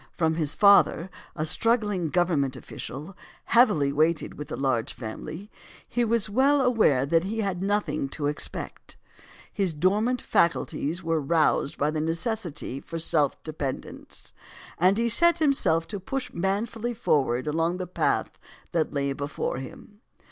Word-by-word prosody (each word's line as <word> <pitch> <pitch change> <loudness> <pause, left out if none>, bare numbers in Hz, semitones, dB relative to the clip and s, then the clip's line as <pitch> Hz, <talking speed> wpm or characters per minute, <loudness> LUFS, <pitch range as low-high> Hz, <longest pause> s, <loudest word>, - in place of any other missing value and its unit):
From 160 -1 +2
his 155 -3 0
father, 200 -3 +5 0.2
a 155 - -2
struggling 210 -1 +2
Government 155 -5 +1
official, 150 +9 -8 0.3
heavily 190 - +3
weighted 155 +2 +1
with 150 - -9
a - - -2
large 130 -4 -1
family, 155 - -8 0.4
he 240 - 0
was 230 -1 +1
well 270 +7 +3
aware 225 - +3
that 165 +4 +2
he 220 +3 -2
had 190 -3 -2
nothing 205 -8 -1
to 145 +1 -4
expect; 145 +1 -5 0.6
his 190 -6 0
dormant 210 +10 +1
faculties 170 -1 0
were 165 -1 0
roused 155 -1 +1
by 150 +2 +1
the 155 0 -2
necessity 165 - -3
for 165 - -7
self 155 -3 +1
dependence, 145 -4 -6 0.5
and 185 +4 +4
he 235 +1 +1
set 340 +9 +4
himself 270 - +2
to 205 - -4
push 270 +7 -5
manfully 220 +6 -2
forward 135 - +1
along 165 +3 0
the 185 - -4
path 180 - -1 0.3
that 160 -3 -1
lay 140 -1 0
before 140 -2 -3
him. 205 +10 -11
170 Hz, 145 wpm, -26 LUFS, 150-210 Hz, 0.6 s, father